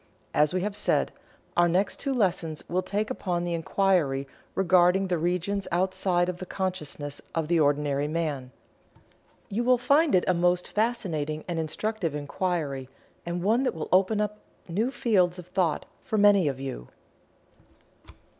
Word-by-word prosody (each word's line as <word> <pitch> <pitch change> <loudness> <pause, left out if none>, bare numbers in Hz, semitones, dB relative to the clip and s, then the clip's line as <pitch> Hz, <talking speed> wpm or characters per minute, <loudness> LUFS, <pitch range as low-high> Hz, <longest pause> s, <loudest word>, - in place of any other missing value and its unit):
As 150 0 +3
we 185 - 0
have 205 +1 -2
said, 205 - +1 0.4
our 175 0 +4
next 185 +4 +1
two 275 - -2
lessons 175 - -1
will 180 +2 0
take 205 +3 -2
upon 175 -2 -2
the 175 -1 -2
inquiry 165 -5 +1 0.3
regarding 185 +1 +4
the 175 -2 +1
regions 180 +4 -1
outside 185 0 +1
of 180 -1 -3
the 185 - -6
consciousness 155 -7 -3
of 165 -2 0
the 170 0 +2
ordinary 145 -1 +1
man. 150 -5 -2 1.0
You 225 +5 -1
will 250 +1 +4
find 280 - +3
it 180 - +4
a 185 - +4
most 175 +1 +1
fascinating 165 -10 -1
and 170 -2 -2
instructive 170 +1 -2
inquiry 145 -3 -2 0.4
and 175 0 -2
one 225 +6 +3
that 265 - 0
will 160 - -5
open 195 +3 +3
up 210 0 -2 0.3
new 205 +8 0
fields 210 -9 +2
of 180 - -8
thought 180 -2 0 0.2
for 220 - -2
many 200 -4 +5
of 135 -2 -2
you. 130 - -6
180 Hz, 155 wpm, -27 LUFS, 160-200 Hz, 1.0 s, many